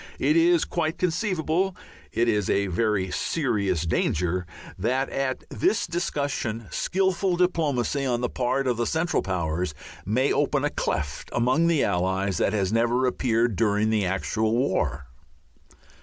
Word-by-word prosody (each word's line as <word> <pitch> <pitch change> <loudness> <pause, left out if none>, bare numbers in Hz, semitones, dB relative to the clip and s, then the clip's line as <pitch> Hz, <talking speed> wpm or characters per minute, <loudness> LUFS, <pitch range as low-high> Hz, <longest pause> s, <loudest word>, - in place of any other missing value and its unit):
It 305 - +2
is 340 0 +4
quite 160 -2 -2
conceivable 180 0 0 0.4
it 120 +1 +1
is 105 -5 +1
a 100 - +2
very 95 0 0
serious 100 - 0
danger 90 +2 0 0.3
that 130 +7 -1
at 135 -1 -2
this 365 - +1
discussion 140 -9 -2
skilful 190 -1 0
diplomacy 150 -7 +1
on 120 -3 0
the 125 - +1
part 130 +3 -1
of 125 -3 0
the 120 - 0
Central 165 +2 0
Powers 85 -3 -2 0.3
may 125 +8 +1
open - - +1
a - - 0
cleft 75 -3 -3
among 130 +8 +2
the 165 -4 +3
Allies 95 0 0
that - - +2
has 100 -1 0
never 120 +3 +2
appeared 120 -3 +1
during 105 +1 +2
the 105 -4 +1
actual 110 +4 0
war. 70 - 0
120 Hz, 140 wpm, -25 LUFS, 100-155 Hz, 0.4 s, is